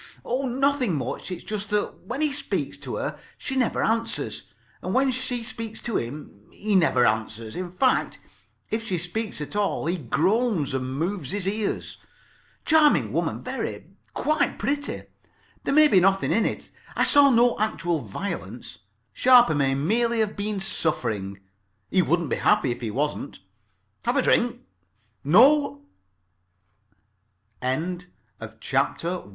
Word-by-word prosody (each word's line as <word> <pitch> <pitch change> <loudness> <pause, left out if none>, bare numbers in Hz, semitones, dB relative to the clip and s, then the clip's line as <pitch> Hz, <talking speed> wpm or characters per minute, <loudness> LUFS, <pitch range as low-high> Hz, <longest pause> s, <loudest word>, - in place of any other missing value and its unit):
Oh, 260 +3 -1
nothing 260 - +1
much. 130 +4 -4
It's 180 -2 -6
just 210 -1 -4
that 210 -3 -2
when 265 +7 -3
he 300 - +2
speaks 285 - -1
to - - -5
her - - -4 0.2
she 265 - -4
never 255 -3 +1
answers, 230 +1 -1 0.3
and - - -3
when 265 0 +3
she 255 -1 -2
speaks 225 -1 -5
to 235 - -1
him 120 -4 -7
he 210 0 -2
never 160 -9 +4
answers. 110 0 -1
In 180 0 -4
fact, 255 +9 +1 0.5
[Pg 220 - +2
3]if 225 - -9
she 185 - -1
speaks 180 +2 -3
at 150 - -6
all 205 -5 0
he 175 +2 -1
groans 175 - +1
and 130 0 -3
moves 170 -3 -2
his 200 +1 -2
ears. 210 +1 -2 0.7
Charming 310 -2 +4
woman, - - -1
very. - - -5 0.2
Quite 300 -2 0
pretty. 285 0 -2 0.6
There - - 0
may 305 0 +8
be 195 - +5
nothing 195 +1 +2
in 225 - +3
it. - - -5 0.2
I - - +2
saw 285 -1 +6
no 240 -1 +3
actual 175 -7 -1
violence. 115 - -6 0.3
Sharper 245 - +6
may 135 -2 +1
merely 230 - +1
have 215 -1 -1
been 205 0 -2
suffering. 105 - -1 0.5
He 185 - +4
wouldn't 170 -2 0
be - - +1
happy 130 - +2
if 120 - -5
he 115 - -3
wasn't. 145 +4 -3 0.7
Have - - +1
a - - +3
drink. - - +1
200 Hz, 140 wpm, -25 LUFS, 150-240 Hz, 0.7 s, may